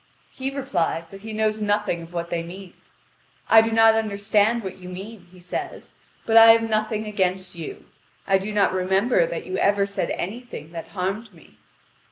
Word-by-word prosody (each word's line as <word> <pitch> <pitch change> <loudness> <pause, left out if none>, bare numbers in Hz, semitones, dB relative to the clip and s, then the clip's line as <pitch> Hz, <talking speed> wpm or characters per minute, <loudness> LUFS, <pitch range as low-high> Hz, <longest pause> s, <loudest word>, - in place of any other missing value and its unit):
He 265 0 -4
replies 175 - -2
that 195 0 -12
he 220 +1 -7
knows 215 0 -1
nothing 205 -4 0
of 165 +1 -11
what 170 -1 -4
they 170 - -1
mean. 180 +2 -10 0.7
"I 225 - +8
do 225 - 0
not 225 0 +5
understand 215 +1 +1
what 190 -1 -7
you 180 0 -10
mean," 190 +1 -9
he 185 - -16
says; 180 0 -6 0.3
"but 225 0 +4
I 225 0 +10
have 225 0 +1
nothing 215 0 -1
against 190 -3 -1
you. 165 -3 -8 0.4
I 195 -1 +3
do 200 +3 -5
not 205 -2 +2
remember 190 +1 +2
that 165 - -5
you 185 - -3
ever 200 0 +3
said 200 0 -3
anything 200 -6 -6
that 165 -1 -7
harmed 200 +4 -4
me." 165 - -20
200 Hz, 185 wpm, -23 LUFS, 180-220 Hz, 0.7 s, I